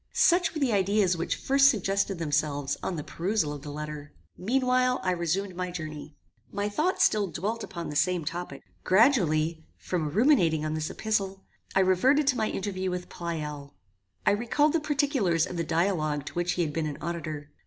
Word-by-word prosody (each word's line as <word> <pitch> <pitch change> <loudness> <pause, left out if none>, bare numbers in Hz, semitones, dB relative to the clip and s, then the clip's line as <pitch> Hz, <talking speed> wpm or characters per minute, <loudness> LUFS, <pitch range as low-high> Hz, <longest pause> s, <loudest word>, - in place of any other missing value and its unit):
Such 350 -1 +3
were - - -2
the 270 -4 +1
ideas 195 -1 +2
which 170 - -2
first 275 +1 +4
suggested 195 -4 0
themselves 145 -3 -1
on 185 - -3
the 150 - -4
perusal 175 -3 -1
of 145 - -8
the 145 - -8
letter. 150 -1 -7 0.2
Meanwhile, 255 +3 +1
I 185 - +1
resumed 180 +2 -1
my 180 0 -3
journey. 155 -3 -7 0.4
My 205 +1 -2
thoughts 315 - +1
still 210 -2 +2
dwelt 205 +8 -3
upon 170 -2 -6
the - - -7
same 180 0 +1
topic. 175 +3 -5 0.2
Gradually 170 - +3
from 165 -5 -2
ruminating 175 - +3
on 155 - -2
this 155 0 -2
epistle, 195 -3 -2 0.3
I 190 - +5
reverted 255 +11 +3
to 270 -2 +3
my 220 -2 0
interview 190 -1 -3
with 180 0 -4
Pleyel. 150 - -5 0.5
I - - +5
recalled 240 +8 +2
the 330 - +3
particulars 275 - +1
of 180 - -7
the 170 - -1
dialogue 160 -4 0
to - - -7
which 175 +1 0
he 175 - 0
had 150 -2 -3
been 160 0 -1
an 145 - -5
auditor. 155 -3 -5
180 Hz, 185 wpm, -27 LUFS, 155-215 Hz, 0.5 s, I